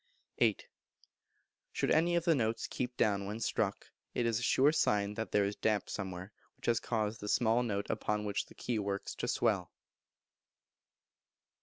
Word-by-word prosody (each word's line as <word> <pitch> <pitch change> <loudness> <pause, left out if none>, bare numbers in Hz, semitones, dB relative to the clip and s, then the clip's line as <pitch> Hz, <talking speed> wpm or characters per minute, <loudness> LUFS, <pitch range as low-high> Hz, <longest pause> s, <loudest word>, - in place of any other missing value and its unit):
viii. - - +4 1.1
Should - - 0
any 170 +2 +4
of 170 -1 +1
the 170 - +5
notes 115 -5 0
keep 125 0 -4
down 100 -2 +2
when 105 +2 -4
struck, - - -1 0.3
it 120 - +1
is 115 -1 +1
a - - -6
sure 135 +4 +4
sign 105 -9 +2
that 115 +1 -4
there 105 -1 +3
is 100 +1 -2
damp 110 -2 0
somewhere, 95 -1 -5 0.3
which - - -12
has 115 -2 +3
caused 110 -1 -1
the 105 - -5
small 115 +2 +3
note 100 -4 -2
upon 105 0 -1
which 100 -1 -1
the - - -16
key 120 -3 -2
works 100 -1 -3
to - - -4
swell. - - +1
110 Hz, 170 wpm, -33 LUFS, 100-120 Hz, 1.1 s, the